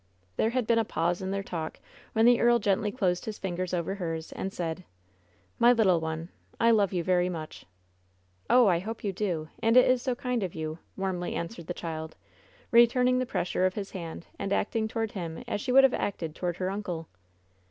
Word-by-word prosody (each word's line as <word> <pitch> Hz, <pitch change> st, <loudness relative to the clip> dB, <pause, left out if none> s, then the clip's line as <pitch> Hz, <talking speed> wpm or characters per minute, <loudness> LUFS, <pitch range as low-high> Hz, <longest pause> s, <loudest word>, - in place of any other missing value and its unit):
There 220 Hz, -, +2 dB
had 250 Hz, 0 st, 0 dB
been 230 Hz, 0 st, +3 dB
a -, -, +3 dB
pause 175 Hz, -3 st, -1 dB
in 190 Hz, -, -3 dB
their 195 Hz, 0 st, -2 dB
talk, 160 Hz, -4 st, -5 dB, 0.3 s
when 220 Hz, 0 st, +4 dB
the 240 Hz, 0 st, +6 dB
earl 240 Hz, 0 st, +5 dB
gently 210 Hz, -1 st, +1 dB
closed 185 Hz, -7 st, 0 dB
his 215 Hz, -1 st, -5 dB
fingers 185 Hz, -1 st, -3 dB
over 175 Hz, +1 st, -1 dB
hers, 165 Hz, -4 st, -4 dB
and 195 Hz, -, -4 dB
said: 170 Hz, -1 st, -4 dB, 0.8 s
"My 240 Hz, +1 st, +7 dB
little 195 Hz, -7 st, +4 dB
one, 160 Hz, +1 st, -4 dB, 0.3 s
I 230 Hz, 0 st, +5 dB
love 205 Hz, -4 st, +3 dB
you 180 Hz, -3 st, -1 dB
very 180 Hz, 0 st, +2 dB
much." 155 Hz, -, -7 dB, 0.8 s
"Oh, 250 Hz, -1 st, +6 dB
I 175 Hz, -4 st, +3 dB
hope 220 Hz, +5 st, -6 dB
you 200 Hz, -2 st, -1 dB
do, 175 Hz, -6 st, -2 dB
and 225 Hz, +2 st, +4 dB
it 255 Hz, -, +7 dB
is 255 Hz, -1 st, +3 dB
so 250 Hz, -1 st, -1 dB
kind 250 Hz, -2 st, -2 dB
of 185 Hz, -3 st, -3 dB
you!" 160 Hz, 0 st, -4 dB, 0.2 s
warmly 185 Hz, -2 st, -2 dB
answered 170 Hz, 0 st, -5 dB
the 175 Hz, -, -4 dB
child, 160 Hz, -1 st, -5 dB, 0.6 s
returning 250 Hz, +1 st, +5 dB
the 255 Hz, -, -1 dB
pressure 185 Hz, -3 st, 0 dB
of 185 Hz, -, -4 dB
his 200 Hz, -2 st, -5 dB
hand 170 Hz, -2 st, -7 dB
and 195 Hz, -, -3 dB
acting 220 Hz, +2 st, 0 dB
toward 225 Hz, 0 st, -2 dB
him 170 Hz, -4 st, -5 dB
as 205 Hz, -, -2 dB
she 250 Hz, -, -2 dB
would 270 Hz, +2 st, +7 dB
have 270 Hz, -, +5 dB
acted 165 Hz, -6 st, -2 dB
toward 175 Hz, +1 st, -3 dB
her 185 Hz, 0 st, -1 dB
uncle. 180 Hz, -5 st, -4 dB
190 Hz, 205 wpm, -28 LUFS, 170-225 Hz, 0.8 s, My